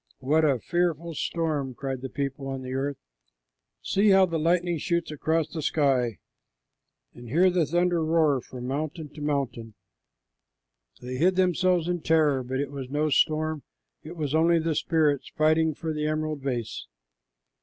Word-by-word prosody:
"What 150 +4 +2
a 140 -4 +3
fearful 170 +3 -1
storm!" 150 -5 -2
cried 135 -1 -4
the 130 - -5
people 140 0 -4
on 135 -1 -4
the 130 0 -5
earth. 135 +1 -2 0.9
"See 205 +2 +2
how 190 -1 +6
the 165 -3 -2
lightning 170 +1 +1
shoots 170 0 -1
across 160 +1 0
the 160 - -5
sky, 135 -7 +1 1.0
and 120 -1 -11
hear 180 +8 +4
the 175 -4 +1
thunder 175 0 +1
roll 155 -4 +2
from 125 0 -9
mountain 150 +4 -4
to 150 - -12
mountain!" 130 -7 -2 1.3
They 125 +1 -5
hid 180 +6 +3
themselves 180 -2 +2
in 175 -1 -1
terror, 155 -5 +3
but 130 +1 -3
it 140 -1 -2
was 135 -3 -6
no 150 +2 0
storm, 155 0 +1 0.4
it 160 +3 -9
was 150 -3 -2
only 165 +2 +4
the 165 0 0
spirits 150 -3 +1
fighting 155 0 +2
for 160 +1 -4
the 150 0 -2
emerald 155 -1 -2
vase. 120 -5 -4
155 Hz, 160 wpm, -26 LUFS, 135-165 Hz, 1.3 s, how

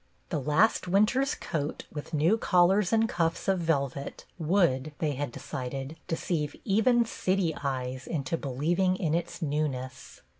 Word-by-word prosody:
The 155 - -1
last 155 - +2
winter's 215 +9 +3
coat 150 -2 -4
with 150 0 -7
new 160 +6 +3
collar 190 -2 +4
and 225 0 +3
cuffs 170 -4 -1
of 190 -1 +2
velvet 140 -5 -2
would, 155 -5 +2
they 155 -4 0
had 145 -1 -3
decided, 135 +2 -5
deceive 160 -3 -2
even 235 +4 +3
city 185 -6 0
eyes 130 -2 -3
into 145 -1 -2
believ 150 +4 -1
ing 185 -1 +3
in 165 -4 -1
its 170 +1 -2
newness. 140 -4 -3
160 Hz, 145 wpm, -28 LUFS, 140-185 Hz, -, collar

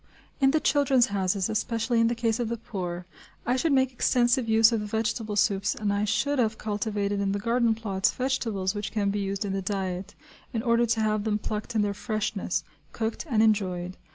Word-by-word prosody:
In 270 -2 +5
the 310 +3 +3
"Children's 275 -6 +3
Houses," 190 -1 0
especially 230 +2 0
in 230 - +4
the 235 - 0
case 230 0 0
of 235 -2 -1
the 235 - -2
poor, 180 -6 -5 0.4
I 245 - +2
should 300 +5 +1
make 265 -1 +3
extensive 240 -1 +2
use 225 +1 +6
of 230 - +1
the 210 - -4
vegetable 220 0 -2
soups 200 -1 +1
and 205 -1 -1
I 205 +1 0
should 265 +7 0
have 220 -2 +1
cultivated 205 -1 -2
in 200 -1 0
the - - 0
garden 230 +2 +1
plots 195 -4 0
vegetables 225 -7 -1
which 205 -1 -4
can 200 -2 0
be 205 - -2
used 195 +1 -2
in 195 - -2
the 195 - -1
diet, 190 0 -3 0.4
in 225 -1 -1
order 235 -1 +3
to 225 0 +1
have 215 -1 +1
them 210 -1 0
plucked 215 +2 -5
in 215 - +3
their 205 -1 -1
freshness, 215 -3 -2 0.3
cooked, 225 +7 -3
and 220 -4 +3
enjoyed. 185 -4 0
215 Hz, 210 wpm, -27 LUFS, 200-235 Hz, 0.4 s, use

